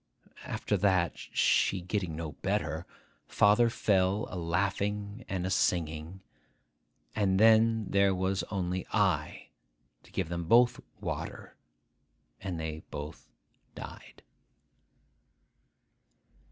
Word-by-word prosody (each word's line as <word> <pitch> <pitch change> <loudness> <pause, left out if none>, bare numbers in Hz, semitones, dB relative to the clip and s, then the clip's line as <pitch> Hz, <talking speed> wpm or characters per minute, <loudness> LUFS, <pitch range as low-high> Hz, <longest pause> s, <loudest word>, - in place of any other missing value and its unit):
After - - -1
that, 95 -6 +2
she 95 - +1
getting 90 -2 -3
no 80 -1 -4
better, 85 -3 -2 0.4
father 105 +3 +4
fell 100 -2 +1
a - - -5
laughing 100 +5 -1
and 95 -2 -2
a 95 - -2
singing; 85 -1 -1 0.9
and 95 -3 +2
then 110 0 +5
there 100 -1 +3
was 95 +1 0
only 90 -2 -2
I 95 -8 0 0.5
to - - -20
give - - -2
them 85 0 -3
both 120 +7 +5 0.2
water, - - -5 0.8
and 90 -4 -4
they 80 0 -4
both 75 +1 -8 0.5
died. - - -10
95 Hz, 100 wpm, -30 LUFS, 85-105 Hz, 0.9 s, then